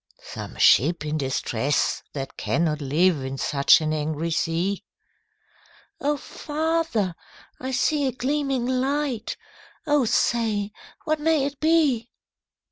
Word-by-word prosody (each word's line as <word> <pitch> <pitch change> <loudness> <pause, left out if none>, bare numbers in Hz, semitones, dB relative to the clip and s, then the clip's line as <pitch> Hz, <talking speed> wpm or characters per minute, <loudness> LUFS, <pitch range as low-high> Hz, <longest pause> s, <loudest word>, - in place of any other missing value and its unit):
'Some - - -8
ship 155 +4 +4
in 150 0 -2
distress 135 0 0
that 135 -2 -5
cannot 155 -3 0
live 150 +2 +2
In 135 +1 -4
such 140 +3 +4
an 155 0 -1
angry 155 +2 -2
sea!' 170 +4 -1 1.2
'O 290 +1 0
father! 305 - -1 0.5
I 260 - -4
see 285 +2 +1
a - - 0
gleaming 270 0 -1
light, 260 -1 -1 0.5
O 295 -4 +3
say, 215 -3 +1 0.3
what 310 -1 0
may 305 -2 +2
it 280 -1 -5
be?' 305 -8 +2
230 Hz, 120 wpm, -24 LUFS, -, 1.2 s, ship